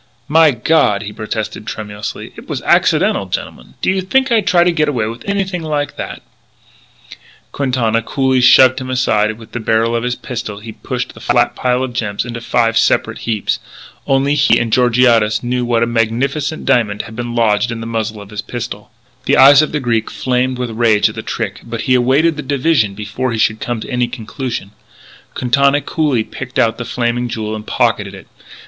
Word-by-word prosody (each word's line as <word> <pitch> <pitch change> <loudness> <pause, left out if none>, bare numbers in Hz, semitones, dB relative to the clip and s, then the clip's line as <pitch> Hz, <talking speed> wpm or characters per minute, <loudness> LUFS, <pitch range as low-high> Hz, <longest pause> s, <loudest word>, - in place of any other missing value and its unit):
"My 160 +1 +5
God," 120 -5 +2
he 105 0 -7
protested 110 0 -5
tremulously, 105 -1 -6
"it - - -13
was - - -4
accidental, - - +2
gentlemen. 60 - -6
Do - - +3
you 190 0 0
think 260 +8 +1
I'd 220 -4 +2
try 175 -1 +4
to 175 - +3
get 155 -3 +1
away 120 -7 -1
with 115 - -6
anything 190 -3 -1
like 150 -2 -2
that - - -7 0.6
" - - -21
Quintana 125 -5 0
coolly 130 +1 +1
shoved 130 +1 +6
him 130 - -6
aside 125 -5 +1
and 110 - -5
with 110 -1 -14
the 120 - -4
barrel 115 +1 +1
of 115 - 0
his 125 0 -2
pistol 120 -5 -6
he 110 +1 -9
pushed - - -5
the - - -14
flat - - +1
pile 125 0 0
of 130 -2 -4
gems 110 -3 -2
into 120 -1 -6
five 115 -1 +1
separate - - +1
heaps. 110 -3 -1 0.5
Only 135 +1 +2
he 145 0 +4
and 115 -2 -1
Georgiades 120 -3 +3
knew 125 0 -1
that 115 -1 +2
a - - +3
magnificent 125 +7 -1
diamond 105 -4 +1
had 110 - -11
been 120 0 -5
lodged 115 0 +2
in 115 - -5
the 115 - -6
muzzle 110 -2 -3
of 100 - -16
his 105 0 -4
pistol. 110 -2 -7 0.4
The - - +3
eyes 140 +2 +8
of 155 - -1
the 150 - -1
Greek 115 -4 -1
flamed 130 0 -1
with 125 -2 -3
rage 110 -2 +3
at - - -8
the - - -5
trick, - - -4
but 115 -1 -5
he 130 - +1
awaited 135 +6 +3
the - - -3
division 135 -7 +1
before 105 +5 -3
he 115 - -2
should 110 0 +1
come 120 -2 -3
to - - -7
any 125 -1 +1
conclusion. 120 -2 -6 0.6
Quintana 140 +3 +2
coolly 145 -7 0
picked 130 +3 -8
out 115 0 +2
The 120 - -4
Flaming 120 0 -1
Jewel 110 -1 -4
and 110 0 -8
pocketed 105 -4 0
it. 95 - -12
120 Hz, 200 wpm, -16 LUFS, 110-135 Hz, 0.6 s, eyes